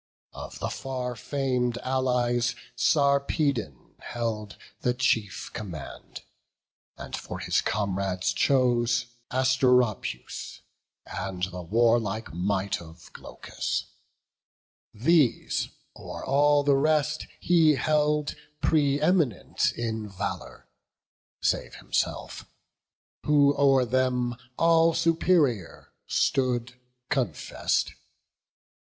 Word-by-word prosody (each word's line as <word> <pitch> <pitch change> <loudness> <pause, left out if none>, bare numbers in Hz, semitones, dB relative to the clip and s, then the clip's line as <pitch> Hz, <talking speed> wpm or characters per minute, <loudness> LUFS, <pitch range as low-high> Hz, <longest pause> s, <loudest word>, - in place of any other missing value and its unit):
Of - - -8
the - - -3
far 125 -2 -4
fam'd 125 -1 -1
Allies, 125 -2 +1 0.2
Sarpedon 140 - +1
held 110 -3 -4 0.2
The 125 0 0
chief 110 -6 0
command; 90 -9 -8 0.7
and - - -6
for - - -6
his - - +1
comrades 95 -2 -1
chose 120 -1 +2 0.2
Asteropaeus, 125 - +1 0.4
and 90 -1 -5
the 90 -1 -3
warlike 115 +2 +1
might 95 +2 -1
Of 80 0 -14
Glaucus; - - -5 1.0
these 130 +2 +2 0.3
o'er - - -8
all 145 +1 +4
the 140 -1 +4
rest 155 +1 +1
he 165 -4 +4
held 150 +2 +1 0.3
Pre 145 -3 +2
eminent 155 - +1
in 110 -2 -4
valour, 100 +1 -6 0.8
save - - 0
himself, - - -3 0.8
Who 145 -1 +5
o'er 135 -2 +4
them 125 0 0 0.2
all 165 0 +4
superior 160 - +1
stood 125 -2 +1 0.4
confess'd. 120 - -1
125 Hz, 85 wpm, -27 LUFS, 110-145 Hz, 1.0 s, Who